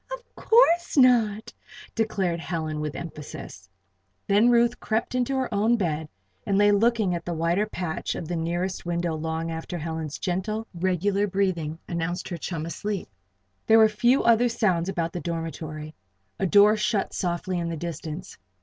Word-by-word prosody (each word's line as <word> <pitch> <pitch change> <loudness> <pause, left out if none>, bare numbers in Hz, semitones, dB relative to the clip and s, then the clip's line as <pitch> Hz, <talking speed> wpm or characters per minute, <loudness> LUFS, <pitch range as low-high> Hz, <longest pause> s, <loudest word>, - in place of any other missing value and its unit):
"Of - - -5
course 350 -9 +3
not!" 230 -5 +4 0.4
declared 195 -6 0
Helen, 160 -3 -3
with 150 0 -3
added - - -4
emphasis. 145 - -10 0.6
Then 210 +4 +4
Ruth 240 0 +3
crept 220 +2 -1
into 255 +2 0
her 260 -3 -1
own 220 +4 +3
bed 160 -6 -2 0.3
and 195 - 0
lay 205 0 +5
looking 215 -2 +2
at 170 -1 -3
the 175 - -3
whiter 170 +6 +1
patch 175 -6 -3
of 165 - -5
the 175 - -2
nearest 175 +3 -2
window 170 -1 -1
long 160 +1 -3
after 165 +2 -5
Helen's 160 -2 -4
gentle, 210 +4 -2
regular 190 +3 0
breathing 180 -5 -1
announced 170 +1 -3
her 175 - -4
chum 165 -1 -4
asleep. 200 +4 -4 0.6
There 220 - +7
were 220 -1 +7
few 240 +5 +3
other 235 +1 +4
sounds 185 -6 +1
about 170 -3 -2
the 175 - -3
dormitory. 160 -2 -5 0.5
A 195 - +1
door 205 +3 +6
shut 210 -1 0
softly 180 +1 -2
in 170 0 -2
the 165 - -4
distance. 170 +1 -6
180 Hz, 165 wpm, -25 LUFS, 165-215 Hz, 0.6 s, There